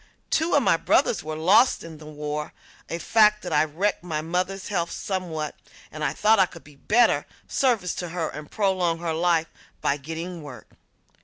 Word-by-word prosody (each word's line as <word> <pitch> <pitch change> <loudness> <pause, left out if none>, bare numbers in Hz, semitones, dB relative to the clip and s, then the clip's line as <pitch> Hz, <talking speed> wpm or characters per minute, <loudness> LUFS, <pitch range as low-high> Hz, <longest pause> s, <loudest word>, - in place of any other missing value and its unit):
Two 320 +2 +2
of - - +4
my - - +4
brothers 215 - +2
were 155 0 -4
lost 185 +11 +4
in 160 -2 -10
the 155 - -11
war, 150 0 -5 0.4
a 170 - -2
fact 210 +3 +4
that 155 -3 +1
wrecked 200 +1 0
my 160 -4 -2
mother's 180 +4 -2
health 170 -4 -1
somewhat 170 -7 -3 0.4
and 155 0 -6
I 145 - +1
thought 210 +7 +3
I 190 - +5
could 165 -1 -13
be 150 - -16
of 140 - -27
better 240 +3 +4 0.2
service 230 -10 +1
to 175 - -4
her 165 -1 -2
and 150 0 -9
prolong 185 -5 +1
her 165 -1 -2
life 165 -1 +1 0.3
by 140 - 0
getting 165 +4 -6
work. 140 -4 -11
170 Hz, 185 wpm, -25 LUFS, 155-190 Hz, 0.4 s, I